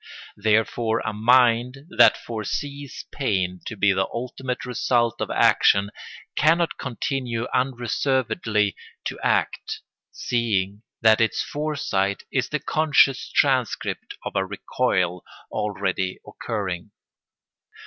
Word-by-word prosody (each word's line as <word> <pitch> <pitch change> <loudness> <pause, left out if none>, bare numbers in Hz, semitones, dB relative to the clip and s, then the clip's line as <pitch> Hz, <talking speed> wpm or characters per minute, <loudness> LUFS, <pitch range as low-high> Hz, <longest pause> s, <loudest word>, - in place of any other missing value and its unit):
Therefore 110 +2 +1
a 110 - -2
mind 125 +4 +3
that - - +7
foresees 140 +5 -5
pain 95 -9 -1
to 110 - -5
be 100 0 +4
the 95 0 0
ultimate 125 +1 -4
result 120 -2 0
of - - -2
action 100 +1 +4 0.4
cannot 165 +2 +2
continue 125 -2 -2
unreservedly 125 - 0 0.3
to - - -4
act, - - -1 0.3
seeing 105 -5 -1 0.2
that 110 0 +5
its 115 - +1
foresight 135 -10 -1
is 130 -2 0
the 150 - 0
conscious 145 -4 +2
transcript 130 -5 0
of - - -5
a - - +2
recoil 90 -1 -1 0.3
already 95 -2 -2
occurring. 95 -6 -4
115 Hz, 105 wpm, -24 LUFS, 105-130 Hz, 0.4 s, that